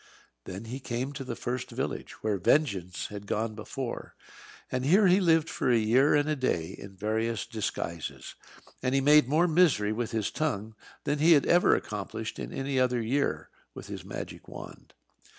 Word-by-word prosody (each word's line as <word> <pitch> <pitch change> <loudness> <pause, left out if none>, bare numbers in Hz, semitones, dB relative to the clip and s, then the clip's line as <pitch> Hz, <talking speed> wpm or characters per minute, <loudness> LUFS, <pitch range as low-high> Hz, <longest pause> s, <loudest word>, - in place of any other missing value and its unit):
Then 95 +4 -7
he 125 +4 -5
came 130 +2 -3
to 140 -1 -5
the 130 - -5
first 125 +1 -4
village, - - -5
where 105 -3 0
Vengeance 95 - +1
had 105 -1 -8
gone 110 +2 -1
before, 120 +3 -6 0.6
and 130 -1 -1
here 190 +9 +5
he 185 +1 +5
lived 165 -4 +3
for - - -1
a 120 - +5
year 120 +7 +4
and 145 0 +2
a 155 - +1
day 105 - -1
in 100 -1 -11
various 110 +2 -1
disguises; 95 -7 -4 0.5
and 130 +1 0
he - - +4
made 150 -1 +6
more 160 +5 +4
misery 155 -11 +3
with 115 +1 -2
his 110 -3 -1
tongue 110 -8 -2 0.3
than 145 0 0
he 165 +3 +7
had 145 - +4
ever 175 +1 +5
accomplished 110 +1 -5
in - - -5
any 135 0 -1
other 125 -1 +2
year 130 +5 -1 0.2
with - - -9
his - - -6
magic - - -7
wand. - - -11
125 Hz, 180 wpm, -29 LUFS, 110-145 Hz, 0.6 s, he